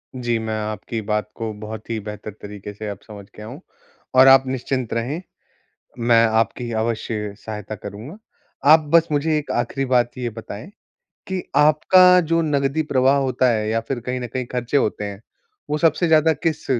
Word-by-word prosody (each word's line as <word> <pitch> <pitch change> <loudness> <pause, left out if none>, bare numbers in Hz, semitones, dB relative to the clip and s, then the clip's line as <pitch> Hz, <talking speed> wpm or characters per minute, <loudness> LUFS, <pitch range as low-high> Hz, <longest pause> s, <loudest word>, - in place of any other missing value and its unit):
जी। 120 -2 -1
मैं 110 -1 -3
आपकी 110 +2 -4
बात 105 0 -2
को 115 -1 -4
बहुत 110 +1 -8
ही 115 -1 -2
बेहतर 105 +1 -7
तरीके 105 0 -8
से 105 +1 -7
अब 100 - -7
समझ 105 -2 -10
गया 105 - -9
हूँ - - -9 0.5
और 130 +1 +8
आप 135 0 +8
निश्चिंत 130 -1 -2
रहें, 125 +9 -2 0.8
मैं 115 -1 +4
आपकी 115 +2 0
अवश्य 110 -2 -3
सहायता 110 -1 -7
करूँगा। 105 - -9 0.6
आप 160 - +7
बस 165 0 +6
मुझे 155 +1 +1
एक 150 - -4
आखिरी 135 +3 -1
बात 125 -2 +1
ये 125 -1 -2
बताएँ 110 - -9 0.6
कि 190 -1 -2
आपका 180 +5 +6
जो 165 0 +1
नकदी 145 -1 0
प्रवाह 135 -2 +3
होता 130 -2 +1
है? 110 -2 -1
या 115 +1 +1
फिर 120 +2 -4
कहीं 125 +2 -4
न 125 - -4
कहीं 125 +2 -4
खर्चे 125 +2 0
होते 105 -5 0
हैं 100 0 -7 0.5
वो 150 - 0
सबसे 165 +2 +2
ज़्यादा 160 0 +4
किस 160 -1 -3
120 Hz, 180 wpm, -21 LUFS, 110-145 Hz, 0.8 s, और